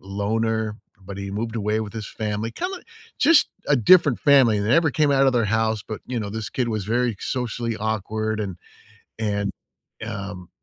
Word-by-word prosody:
loner, 110 Hz, +2 st, -1 dB, 0.2 s
but 95 Hz, +1 st, -9 dB
he 100 Hz, 0 st, -5 dB
moved 115 Hz, +3 st, -3 dB
away 105 Hz, +1 st, 0 dB
with 105 Hz, -2 st, -5 dB
his 110 Hz, -2 st, -5 dB
family. 105 Hz, +1 st, -3 dB
Kinda 365 Hz, -, -4 dB, 0.4 s
just 330 Hz, -2 st, +5 dB, 0.2 s
a 145 Hz, -, +5 dB
different 145 Hz, -, +5 dB
family, 130 Hz, -7 st, +5 dB
they 105 Hz, -, -1 dB
never 160 Hz, +3 st, +4 dB
came 150 Hz, +1 st, +2 dB
out 135 Hz, 0 st, +4 dB
of 130 Hz, -, +4 dB
their 120 Hz, -2 st, +2 dB
house, 110 Hz, 0 st, 0 dB
but, 110 Hz, -, -6 dB
you 125 Hz, -2 st, -3 dB
know, 100 Hz, -1 st, -4 dB
this 110 Hz, 0 st, -5 dB
kid 125 Hz, -2 st, -1 dB
was 110 Hz, -4 st, -2 dB
very 120 Hz, -1 st, 0 dB
socially 120 Hz, -2 st, -2 dB
awkward, 110 Hz, +1 st, -2 dB
and 95 Hz, -4 st, -4 dB, 0.6 s
and, 100 Hz, -2 st, -1 dB, 0.6 s
um, 100 Hz, -4 st, -6 dB
110 Hz, 180 wpm, -23 LUFS, 105-120 Hz, 0.6 s, just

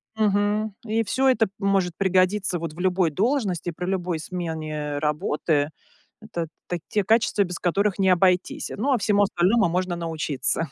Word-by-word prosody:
мгм, 210 Hz, 0 st, +1 dB
и 225 Hz, +1 st, 0 dB
всё 265 Hz, +5 st, +1 dB
это 225 Hz, -3 st, +3 dB
может 195 Hz, -3 st, +1 dB
пригодиться 190 Hz, -1 st, +2 dB
вот 165 Hz, -2 st, -5 dB
в 170 Hz, -, -13 dB
любой 180 Hz, -3 st, +2 dB
должности, 195 Hz, -, 0 dB
при 180 Hz, +2 st, -5 dB
любой 180 Hz, -3 st, -1 dB
смене 155 Hz, -4 st, -4 dB
работы. 150 Hz, 0 st, 0 dB, 0.5 s
Это 170 Hz, -6 st, -4 dB, 0.2 s
та 175 Hz, -, -2 dB
те 210 Hz, -3 st, +1 dB
качества, 220 Hz, -1 st, +3 dB
без 180 Hz, -1 st, -5 dB
которых 195 Hz, +3 st, +1 dB
не 190 Hz, -1 st, +3 dB
обойтись. 180 Hz, 0 st, +2 dB
Ну, 270 Hz, +6 st, 0 dB
а -, -, +3 dB
всему 205 Hz, 0 st, +3 dB
остальному 190 Hz, +1 st, +2 dB
можно 180 Hz, 0 st, -1 dB
научиться. 160 Hz, -2 st, -2 dB
185 Hz, 155 wpm, -24 LUFS, 170-205 Hz, 0.5 s, это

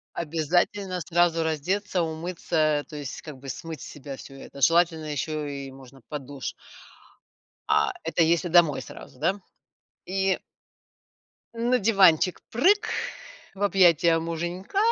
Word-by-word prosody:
Обязательно 175 Hz, +4 st, 0 dB
сразу 170 Hz, -1 st, +2 dB
раздеться, 180 Hz, +4 st, -1 dB
умыться, 160 Hz, -2 st, -1 dB
то 150 Hz, -, -8 dB
есть, 145 Hz, -3 st, -6 dB
как 150 Hz, -4 st, -9 dB
бы, 135 Hz, +1 st, -11 dB
смыть 160 Hz, +1 st, -6 dB
с -, -, -8 dB
себя 140 Hz, -1 st, -8 dB
всё 135 Hz, -, -12 dB
это. 140 Hz, -, -11 dB
Желательно 165 Hz, +1 st, +3 dB
ещё 150 Hz, +1 st, -3 dB
и 140 Hz, -1 st, -6 dB
можно 135 Hz, 0 st, -14 dB
под 150 Hz, -3 st, -5 dB
душ. 140 Hz, -2 st, -5 dB, 1.2 s
А -, -, +3 dB
это 170 Hz, -, +1 dB
если 170 Hz, +2 st, +2 dB
домой 165 Hz, -4 st, +4 dB
сразу, 125 Hz, -, -12 dB
да? 190 Hz, +7 st, 0 dB, 0.7 s
И 190 Hz, 0 st, 0 dB, 1.1 s
На 240 Hz, +2 st, +1 dB
диванчик 190 Hz, -5 st, +4 dB
прыг 375 Hz, -, +3 dB, 0.6 s
в 200 Hz, -, -7 dB
объятия 170 Hz, -4 st, +4 dB
муженька, 175 Hz, -, -4 dB
165 Hz, 130 wpm, -26 LUFS, 150-185 Hz, 1.2 s, домой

